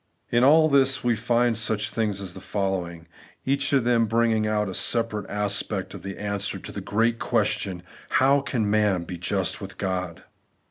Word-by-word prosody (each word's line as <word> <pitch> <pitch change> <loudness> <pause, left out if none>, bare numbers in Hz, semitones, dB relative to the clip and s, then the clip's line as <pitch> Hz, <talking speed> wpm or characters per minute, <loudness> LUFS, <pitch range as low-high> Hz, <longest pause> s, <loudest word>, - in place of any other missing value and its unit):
In 120 +1 +3
all 155 +4 +6
this 135 -2 +3
we 120 -1 +2
find 120 +1 +1
such 110 0 0
things 105 -4 -1
as 95 -3 -7
the - - -10
following; 90 -4 -3 0.4
each 140 +1 +1
of 135 -4 +3
them 115 -1 +2
bringing 115 -1 +1
out 105 -1 0
a 95 - -5
separate 115 0 0
aspect 105 -1 -1
of - - -9
the 100 0 -7
answer 100 -1 -3
to - - -8
the - - -6
great 115 +2 0
question, 90 -2 -1 0.2
' - - -23
How 140 +2 +4
can 120 -6 -1
man 105 -4 +2
be 85 0 -7
just 85 - -1
with - - -8
God 90 -2 -3
110 Hz, 185 wpm, -25 LUFS, 100-120 Hz, 0.4 s, all